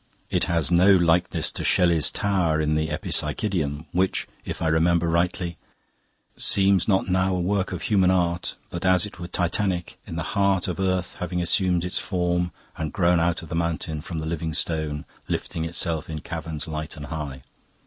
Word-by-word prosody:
It - - +2
has 85 -1 0
no 90 +3 +6
likeness 85 -2 +2
to - - -4
Shelley's 85 -3 +3
tower, 90 -6 +1
in 75 0 +1
the 80 0 +1
'Epipsychidion,' 75 -1 -1
which, 95 +2 0 0.2
if - - -5
I 80 - 0
remember 85 +2 +3
rightly 85 +1 0 0.4
" - - -43 0.3
"'Seems 95 -2 +3
not 95 -3 +2
now 95 0 +2
a - - -1
work 95 +2 0
of 90 -2 -5
human 95 -4 +3
art, 90 -2 0 0.2
But 85 +1 -5
as 95 +1 +4
it 105 -4 -10
were 85 - -5
titanic, 90 +1 -1
in 80 - -6
the 85 - -2
heart 100 -2 +2
Of 90 -1 -3
earth 95 -2 -1
having 90 0 -2
assumed 90 0 +2
its 90 - -1
form 90 -1 0 0.3
and 80 -2 -3
grown 90 -1 +3
Out 85 0 0
of 80 - -10
the - - -3
mountain, 80 -2 -2
from 85 +2 -6
the 80 - -3
living 80 -1 -3
stone, 80 -3 -1 0.2
Lifting 80 -1 -3
itself 80 -1 -1
in 80 -1 -5
caverns 80 -1 -5
light 75 -1 -4
and 75 - -6
high. 75 -4 -6
85 Hz, 185 wpm, -24 LUFS, 80-90 Hz, 0.4 s, no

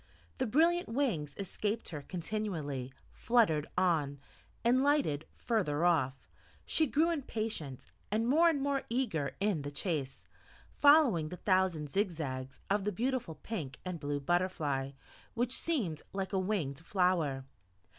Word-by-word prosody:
The 260 - +1
brilliant 335 +7 +3
wings 210 - -1
escaped 210 +3 -3
her 150 -4 -5
continually, 160 -7 -3 0.2
fluttered 210 -11 +2
on, 155 -6 +1 0.4
and 250 +3 +4
lighted 280 - +2
further 175 -9 0
off; 135 -6 +1 0.4
she 315 - +2
grew 315 +6 +2
impatient, 215 - -4 0.2
and 220 +3 +1
more 325 +6 +5
and 310 -4 +1
more 275 0 0
eager 230 - -1
in 200 -6 +1
the 145 - -4
chase, 145 -2 -3 0.5
following 285 - +5
the 180 - -7
thousand 185 -7 +1
zig 200 +1 +2
zags 135 -5 -5
of 200 0 +1
the 210 - 0
beautiful 240 -4 -1
pink 150 - -5
and 180 -2 -4
blue 145 -1 -2
butterfly, 145 -4 0 0.4
which 245 +1 0
seemed 225 - -1
like 195 0 -3
a 190 - +2
winged 180 -8 -1
flower. 165 -7 +1
185 Hz, 135 wpm, -32 LUFS, 150-235 Hz, 0.5 s, more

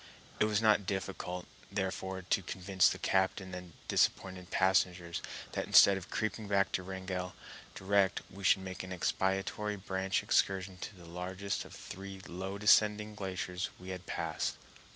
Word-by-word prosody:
It - - +5
was 105 0 +1
not 110 -1 +6
found 100 - -14
difficult, 95 -2 -3 0.3
therefore, 95 -1 -2
to 95 - +1
convince 95 +1 +2
the - - -3
captain 95 0 +1
and 90 -2 -7
disappointed 95 -1 +1
passengers 90 -2 +2 0.3
that - - -2
instead 100 - +8
of 95 -2 -6
creeping 110 0 -2
back 100 -1 +2
to - - 0
Wrangell 95 -1 -4 0.4
direct 100 0 +2
we 100 +2 -10
should 95 0 +4
make 95 -1 -5
an 95 - -8
expiatory 95 +3 0
branch 95 -1 -1
excursion 95 -1 +1
to 100 - -6
the 90 -2 -13
largest 95 +3 -4
of - - -12
the - - -9
three 95 0 -8
low 95 +3 -5
descending 105 0 +4
glaciers 95 -2 -3
we 90 +1 -9
had 95 -1 -6
passed. - - -2
95 Hz, 160 wpm, -33 LUFS, 90-100 Hz, 0.4 s, instead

